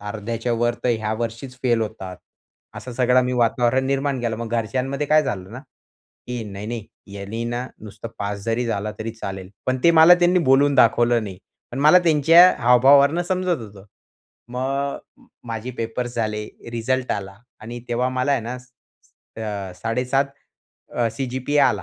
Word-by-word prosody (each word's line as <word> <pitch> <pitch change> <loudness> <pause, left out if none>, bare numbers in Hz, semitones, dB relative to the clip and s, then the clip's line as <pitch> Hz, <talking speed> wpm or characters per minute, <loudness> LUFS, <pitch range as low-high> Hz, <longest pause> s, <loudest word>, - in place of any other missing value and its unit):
अर्ध्याच्यावर 115 +3 -2
तर - - +2
ह्या 110 -2 0
वर्षीचं 115 +3 -5
फेल 120 -3 +2
होतात. 95 -4 -5 0.6
असं 125 - -7
सगळं 125 +1 +3
मी 125 - -1
वातावरण 120 +3 +1
निर्माण 135 -1 -1
केलं. 115 -2 -2
मग 115 -1 -6
घरच्यांमध्ये 135 +5 -3
काय 155 +1 +4
झालं 95 -8 -4
ना, 125 - -7 0.7
की 125 -2 -3
"नाही-नाही, 105 +2 -6 0.3
यानी 100 +4 -5
ना, 120 +2 -3
नुसता 110 +1 -9
पास 100 0 -3
जरी 115 +2 0
झाला 105 -1 -2
तरी 110 +1 -4
चालेल." 95 -4 -7 0.2
पण 130 0 0
ते 170 - +7
मला 170 +3 +9
त्यांनी 175 +1 +4
बोलून 140 +1 +4
दाखवलं 120 -1 +4
नाही. 95 -3 -8 0.3
पण 130 - -4
मला 155 +5 +7
त्यांच्या 165 +3 +7
हावभावावरनं 140 +7 +5
समजत 185 -1 -1
होतं. 100 -2 -12 0.6
मग 125 +2 -3 0.3
अ, - - -9 0.5
माझे 115 +2 -4
पेपर्स 120 +2 -3
झाले, 105 -2 -2 0.2
रिझल्ट 125 +2 -1
आला 100 -1 -5 0.3
आणि 120 +3 -7
तेव्हा 120 +1 0
मला 130 +2 0
आहे 135 - +1
ना, 115 +2 -5
अ, - - -7
स 125 0 -25 0.7
स - - -21
7.5 125 +4 0 0.7
अ, 120 -1 +1
सीजीपीए 130 +3 -2
आला. 130 -3 +2
120 Hz, 160 wpm, -22 LUFS, 110-130 Hz, 0.7 s, मला